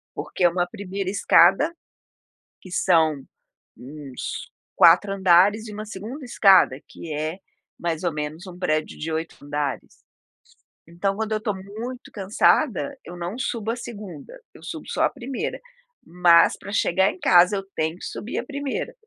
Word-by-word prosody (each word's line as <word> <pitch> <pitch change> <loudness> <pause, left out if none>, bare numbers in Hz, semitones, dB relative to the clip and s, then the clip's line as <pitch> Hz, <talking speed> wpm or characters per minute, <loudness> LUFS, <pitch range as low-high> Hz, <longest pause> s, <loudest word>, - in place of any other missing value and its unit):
Porque - - -4
é 175 - +7
uma 175 +1 -1
1º 195 -1 -5
escada 200 - +4 0.9
que 185 - -13
são 160 -5 +2 0.6
uns 140 0 -7 0.2
4 175 +4 +6
andares 195 +3 +4
e 210 - -8
uma 215 +1 -6
2º 220 +8 -8
escada 190 - +5
que 160 - -8
é 155 +3 -3 0.4
mais 170 0 -2
ou 175 - 0
menos 150 +4 -5
um 180 -1 -10
prédio 155 -4 -1
de 160 +2 -4
8 160 +1 -3
andares. 145 -1 -4 0.8
Então 185 +4 -2
quando 220 +1 -3
eu - - +1
estou 210 -2 -2
muito 220 +6 -8
cansada, 230 +7 +1
eu 175 - -9
não 175 +6 -5
subo 230 -4 -2
a - - -2
2º, 210 - -9
eu - - -16
subo - - -7
só - - 0
a - - +4
1º, 255 +2 -5 0.5
mas 170 -1 +5
pra 200 - -9
chegar 190 -2 +2
em - - -13
casa 180 +3 +5
eu 195 - -4
tenho 160 +2 -1
que - - -9
subir 225 - -6
a - - -5
1º. 285 - -4
185 Hz, 160 wpm, -23 LUFS, 165-215 Hz, 0.9 s, é